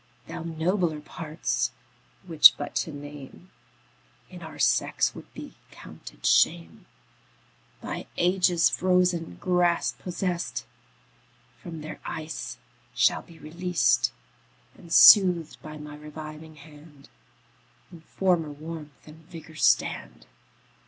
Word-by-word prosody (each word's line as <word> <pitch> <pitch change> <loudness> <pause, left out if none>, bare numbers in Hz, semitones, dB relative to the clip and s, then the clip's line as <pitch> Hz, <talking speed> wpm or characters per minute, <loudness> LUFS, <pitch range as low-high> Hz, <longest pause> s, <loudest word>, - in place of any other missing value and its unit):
Thy - - -7
nobler 165 0 -1
parts, 150 -5 -3 0.6
which 165 -4 +7
but 145 - -6
to 160 - -2
name 145 +4 -11 0.8
In - - -11
our - - -10
sex - - +1
would - - -13
be - - -9 0.2
counted - - -13
shame, 85 -1 +2 0.9
By - - -6
ages 180 -1 +3
frozen 180 - +1
grasp 175 - 0
possest, 180 -1 -3 1.0
From 165 -4 -8
their 155 0 -8
ice 160 0 -6 0.4
shall - - +3
be 170 - -17
released, 170 +3 0 0.6
And, 170 - -16
soothed 180 -6 +7
by 155 0 -9
my 150 0 -9
reviving 155 +1 -10
hand, 150 -1 -16 0.8
In 170 -2 -13
former 175 -2 0
warmth 150 0 -10
and 155 +1 -15
vigour 165 -2 -11
stand. 65 - 0
160 Hz, 105 wpm, -26 LUFS, 150-175 Hz, 1.0 s, which